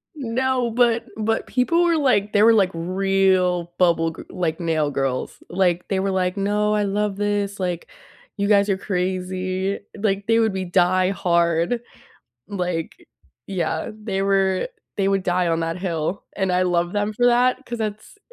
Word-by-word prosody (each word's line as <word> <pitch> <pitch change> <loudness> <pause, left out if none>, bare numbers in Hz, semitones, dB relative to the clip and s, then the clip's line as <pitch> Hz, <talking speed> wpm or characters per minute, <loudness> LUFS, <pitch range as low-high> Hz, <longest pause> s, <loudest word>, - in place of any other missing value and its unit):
No, 255 -2 -1
but 235 -1 +2
but 225 +1 -1
people 335 +8 +2
were 340 -1 +3
like 210 -8 +2
they 205 +1 +5
were 230 0 +7
like 195 -4 +4
real 185 0 +1
bubble 170 -2 +3
g - - -10
like, 170 -3 -2
nail 160 -3 0
girls. 135 -2 -2
Like, 180 -1 +1
they 195 -1 0
were 195 0 0
like, 185 0 0
"No, 210 +1 +1
I 210 - +1
love 205 0 -1
this, 205 -1 -1
like, 180 -2 -3 0.5
you 200 - 0
guys 200 -1 +4
are 195 - +2
crazy." 185 0 -2 0.2
Like, 200 -1 -1
they 225 0 +4
would 220 -3 +2
be 190 -1 -3
die-hard, 175 +2 +2 0.7
like 180 -5 -4 0.4
yeah, 165 -4 -2
they 210 -3 -3
were 195 - +1 0.3
they 195 -1 +1
would 195 -1 +1
die 180 -1 +1
on 165 0 0
that 165 +2 -2
hill 175 0 -3
and 190 -1 -1
I 180 0 +2
love 175 -1 0
them 205 +1 -1
for 245 +3 +2
that 250 +2 +3
'cause 240 -1 -5
that's 215 - -5
195 Hz, 165 wpm, -22 LUFS, 180-210 Hz, 0.7 s, were